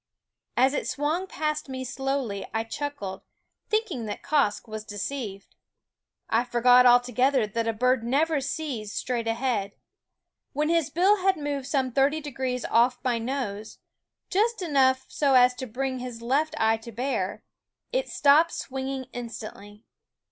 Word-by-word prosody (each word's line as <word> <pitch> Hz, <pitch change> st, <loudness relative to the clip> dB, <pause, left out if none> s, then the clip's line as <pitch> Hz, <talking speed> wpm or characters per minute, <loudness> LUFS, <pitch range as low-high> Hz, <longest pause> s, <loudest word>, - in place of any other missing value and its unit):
As 260 Hz, +3 st, +4 dB
it -, -, -2 dB
swung 310 Hz, +6 st, -1 dB
past 305 Hz, -4 st, -2 dB
me 260 Hz, 0 st, -4 dB
slowly 265 Hz, -5 st, -3 dB
I 225 Hz, -, +1 dB
chuckled, 225 Hz, -6 st, -5 dB, 0.5 s
thinking 395 Hz, -, -1 dB
that 205 Hz, -, -6 dB
Quoskh 275 Hz, -8 st, +1 dB
was 215 Hz, -1 st, -6 dB
deceived. 205 Hz, -1 st, -5 dB, 0.7 s
I 230 Hz, +2 st, +2 dB
forgot 245 Hz, +1 st, +5 dB
altogether 245 Hz, +1 st, +4 dB
that 230 Hz, +2 st, -2 dB
a -, -, +3 dB
bird 250 Hz, +2 st, +1 dB
never 290 Hz, +5 st, +1 dB
sees 265 Hz, -7 st, -4 dB
straight 235 Hz, 0 st, -2 dB
ahead. 225 Hz, -4 st, -1 dB, 0.8 s
When 300 Hz, +2 st, 0 dB
his 330 Hz, -3 st, +2 dB
bill 375 Hz, +7 st, +4 dB
had 380 Hz, -1 st, +2 dB
moved 285 Hz, -3 st, -3 dB
some 265 Hz, -3 st, 0 dB
thirty 275 Hz, +4 st, +2 dB
degrees 260 Hz, -4 st, -3 dB
off 245 Hz, +2 st, +3 dB
my 245 Hz, -2 st, +1 dB
nose, 225 Hz, -4 st, -4 dB, 0.5 s
just 430 Hz, +1 st, +1 dB
enough 265 Hz, -5 st, +3 dB
so 280 Hz, -3 st, +2 dB
as 250 Hz, 0 st, +6 dB
to 255 Hz, +1 st, -6 dB
bring 260 Hz, +3 st, -3 dB
his 245 Hz, -2 st, -6 dB
left 285 Hz, +6 st, +1 dB
eye 225 Hz, 0 st, +3 dB
to 225 Hz, +1 st, -10 dB
bear, 220 Hz, -4 st, -2 dB, 0.5 s
it -, -, -1 dB
stopped 305 Hz, +4 st, +4 dB
swinging 265 Hz, 0 st, -4 dB
instantly. 215 Hz, -3 st, -8 dB
260 Hz, 145 wpm, -26 LUFS, 230-290 Hz, 0.8 s, as